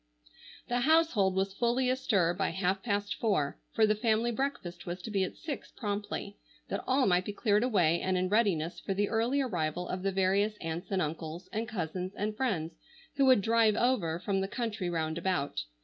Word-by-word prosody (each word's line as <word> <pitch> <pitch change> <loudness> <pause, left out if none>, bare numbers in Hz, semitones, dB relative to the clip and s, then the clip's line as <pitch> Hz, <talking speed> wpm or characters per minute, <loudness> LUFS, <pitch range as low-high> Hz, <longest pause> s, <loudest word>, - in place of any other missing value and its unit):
The 245 0 0
household 260 - +3
was 190 0 0
fully 240 +4 +1
astir 215 -10 +2
by 195 +2 -1
half 190 +2 0
past 205 -2 -1
four, 190 -11 0
for 225 - +4
the 215 - +3
family 225 +2 +1
breakfast 220 -10 -4
was 175 +2 -4
to 225 - -5
be 195 -2 +1
at 185 - -4
six 300 -4 -6
promptly, 205 -1 -4 0.3
that - - -3
all 260 0 +3
might 180 -1 +3
be 205 - -4
cleared 210 -1 +2
away 180 -9 +2
and 185 0 0
in 185 0 +1
readiness 185 -6 +1
for 195 - -3
the 205 +1 +1
early 235 +5 +1
arrival 175 - -2
of 185 - -3
the 195 +1 0
various 195 +3 +1
aunts 165 +2 -5
and 190 -2 +1
uncles 160 +3 -5
and 225 +2 -2
cousins 185 -3 -4
and 210 +1 -2
friends 185 -10 -1 0.4
who 275 - +4
would 255 -5 +6
"drive 225 0 +3
over" 215 -10 +1
from 195 +2 -1
the 195 - -1
country 215 -5 -3
round 160 -1 -1
about. 170 - -1
200 Hz, 195 wpm, -30 LUFS, 180-230 Hz, 0.4 s, would